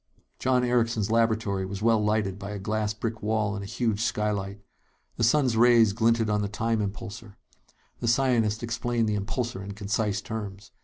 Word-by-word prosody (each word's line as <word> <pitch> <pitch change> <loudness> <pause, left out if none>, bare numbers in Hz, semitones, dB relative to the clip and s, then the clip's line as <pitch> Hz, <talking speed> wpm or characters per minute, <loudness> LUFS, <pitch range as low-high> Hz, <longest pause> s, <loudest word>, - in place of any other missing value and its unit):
John 125 -1 +2
Erickson's 115 -3 +1
laboratory 110 -4 +1
was 100 +2 -5
well 115 -2 +3
lighted 105 -2 0
by 100 0 -6
a 105 - -4
glass 105 +1 -1
brick 110 +1 -4
wall 105 -1 0
and 100 - -4
a - - -7
huge 115 -2 -1
skylight. 105 -3 -1 0.6
The 115 - 0
sun's 130 0 +3
rays 115 -2 +5
glinted 115 0 +2
on 105 -1 +1
the 100 - -1
time 110 +2 -1
impulsor. 105 0 -6 0.6
The - - -3
scientist 115 -3 +2
explained 120 0 -1
the 105 - 0
impulsor 105 0 -3
in 100 +1 -6
concise 105 0 -1
terms. 105 -1 -7
110 Hz, 170 wpm, -27 LUFS, 105-115 Hz, 0.6 s, rays